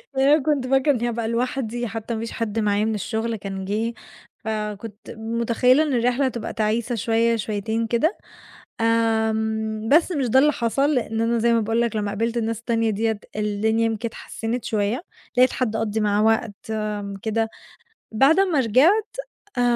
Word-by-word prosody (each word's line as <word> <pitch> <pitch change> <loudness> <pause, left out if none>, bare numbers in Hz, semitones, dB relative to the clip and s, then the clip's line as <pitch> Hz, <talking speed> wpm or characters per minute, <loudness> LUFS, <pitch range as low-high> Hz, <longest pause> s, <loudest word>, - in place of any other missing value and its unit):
لأن 265 +1 +3
أنا 300 -1 +4
كنت 285 -4 0
فاكرة 270 +2 +3
إني 240 -3 0
هابقى 230 -1 -2
لوحدي، 240 0 -2
حتّى 225 +1 -5
ما 220 - -3
فيش 230 - -5
حد 225 -1 -2
معايا 210 0 +1
من 220 -1 0
الشغل 225 +3 -2
كان 195 -2 -6
جِه، 220 +4 -1 0.5
فكنت 210 0 -5
متخيلة 235 +5 +2
إن 295 - -1
الرحلة 245 +3 +2
هتبقى 240 -4 -3
تعيسة 225 +2 0
شوية، 230 +2 +2
شويتين 220 +1 -2
كده. 240 - +1 0.6
آمم، 220 -1 0
بس 325 +6 +4
مش 280 -5 0
ده 260 - +4
اللي 300 +3 +5
حصل، 275 +5 +1
لإن 225 -2 -1
أنا 230 +1 +1
زي 235 +1 +3
ما 230 - +3
باقول 225 +2 0
لك 235 -2 0
لمّا 205 -1 -1
قابلت 230 +3 -2
الناس 225 -1 -1
التانية 230 -1 0
ديّة، 220 0 -1 0.2
الدنيا 215 +2 +1
يمكن 225 +1 -1
اتحسنّت 225 +1 -5
شوية، 215 +6 -1 0.3
لقيت 255 +1 +5
حد 225 -4 -1
أقضّي 220 -1 -1
معاه 210 0 +2
وقت 225 -1 +2 0.7
كده 225 0 0 0.6
بعد 270 +10 +4
أمّا 360 -8 +3
رجعت 320 - +3 0.4
آآ - - +3
230 Hz, 170 wpm, -23 LUFS, 220-245 Hz, 0.7 s, اللي